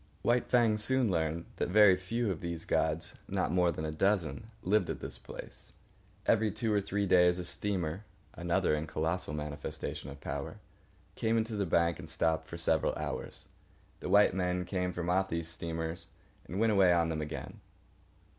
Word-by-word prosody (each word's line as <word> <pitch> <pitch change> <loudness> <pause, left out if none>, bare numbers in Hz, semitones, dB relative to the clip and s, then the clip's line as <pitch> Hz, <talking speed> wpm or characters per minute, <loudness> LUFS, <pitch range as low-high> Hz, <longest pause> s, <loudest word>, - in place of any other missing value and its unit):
White 120 0 +2
Fang 115 -3 +4
soon 130 0 +3
learned 80 -1 -1
that - - -1
very 105 -1 +7
few 105 +4 -1
of 85 - -5
these 85 -1 -4
gods—not 80 -1 -1
more 90 -1 +3
than 80 - -4
a 80 - -2
dozen—lived 105 +4 0
at - - -3
this 65 -3 -7
place. - - -9 0.5
Every 110 -1 +3
two 110 +2 -1
or 100 - +3
three 100 +1 -1
days 90 -1 +5
a 90 - -4
steamer 95 -1 -2 0.3
(another 85 0 +1
and 75 +1 -1
colossal 80 +2 -1
manifestation 75 -2 -5
of 70 0 -9
power) - - -5 0.6
came 115 +1 +1
into 110 0 -1
the 100 -2 -1
bank 85 0 +2
and 80 -3 -8
stopped 80 0 0
for - - -7
several - - +1
hours. - - -5 0.5
The - - -5
white 105 -2 +6
men 90 -1 0
came 90 -1 -1
from 90 -1 -4
off 95 +2 +2
these 85 0 -2
steamers 80 0 -4 0.4
and 95 - -4
went 115 0 +4
away 95 -3 +5
on 85 -1 +3
them 80 -1 -2
again. 75 +1 -6
90 Hz, 175 wpm, -32 LUFS, 80-105 Hz, 0.6 s, very